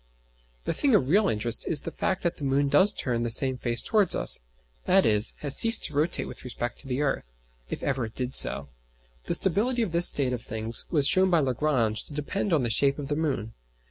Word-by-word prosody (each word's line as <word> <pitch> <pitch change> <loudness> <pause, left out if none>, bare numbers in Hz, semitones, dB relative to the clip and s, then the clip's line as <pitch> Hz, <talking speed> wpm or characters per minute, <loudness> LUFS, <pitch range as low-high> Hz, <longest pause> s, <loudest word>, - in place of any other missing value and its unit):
The - - -3
thing 275 -6 +1
of 135 -8 +1
real 200 +5 +2
interest 115 +2 +1
is 150 - +1
the 165 - -7
fact 185 - -3
that 170 -1 -2
the - - -10
moon 140 +1 0
does 195 +7 +4
turn 120 -3 -3
the 120 - -2
same 130 +3 +3
face 120 -1 -2
towards 210 -4 +3
us; - - +3 0.5
i.e. 180 - +3 0.2
has 145 -2 -3
ceased 230 0 +4
to - - +1
rotate 155 +4 0
with - - -10
respect 120 -1 -6
to 140 - -7
the 135 +3 -2
earth 135 - -4 0.4
(if - - -7
ever 135 -3 -2
it 110 - -12
did 125 0 -5
so). 70 - +3 0.6
The - - +1
stability 230 +7 0
of 200 - -5
this 170 +1 +6
state 130 -3 0
of 120 - -5
things 110 +1 -4
was 145 -5 +2
shown 185 0 +4
by 170 -2 +2
Lagrange 125 -5 -1
to 145 - -9
depend 190 +7 -4
on 155 -6 +1
the 120 - -1
shape 140 +4 +1
of 145 -1 -7
the 145 - -1
moon. 135 -8 -3
140 Hz, 225 wpm, -25 LUFS, 120-175 Hz, 0.6 s, this